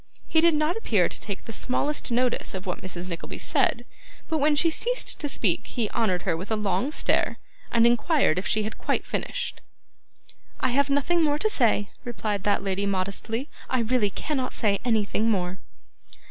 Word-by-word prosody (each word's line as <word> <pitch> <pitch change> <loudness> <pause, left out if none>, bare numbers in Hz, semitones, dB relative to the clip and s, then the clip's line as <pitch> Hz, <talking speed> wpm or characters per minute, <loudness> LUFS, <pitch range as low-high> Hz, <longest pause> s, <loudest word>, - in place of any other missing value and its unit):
He 320 - +3
did 335 -1 +5
not 305 +3 +1
appear 210 - +2
to - - -4
take 200 -2 -5
the 225 - -6
smallest 285 +6 -1
notice 245 -3 +1
of 190 +1 -6
what 180 - -3
Mrs. 180 -1 -4
Nickleby 170 -2 -5
said, - - +1 0.4
but 315 - 0
when 295 +1 +3
she 330 +3 +3
ceased - - 0
to 295 - -2
speak - - +1
he 230 -5 -2
honoured 185 -6 0
her - - +1
with 180 +5 -6
a 220 - +1
long 210 +5 0
stare, - - +1 0.3
and 230 0 +5
inquired 240 - +3
if 185 - -4
she 215 - +2
had 215 - -5
quite - - -1
finished. - - -3 1.0
'I - - +1
have 280 +3 +2
nothing 285 +5 +2
more 295 -2 +2
to 430 +8 +1
say,' 215 - +2
replied 215 -4 -2
that 205 -1 +2
lady 195 +1 -1
modestly. 200 +6 -2 0.2
'I 255 - +1
really 230 -2 +2
cannot 260 +5 -3
say 200 -3 +2
anything 220 -1 +1
more. 185 -3 -1
230 Hz, 185 wpm, -26 LUFS, 200-290 Hz, 1.0 s, did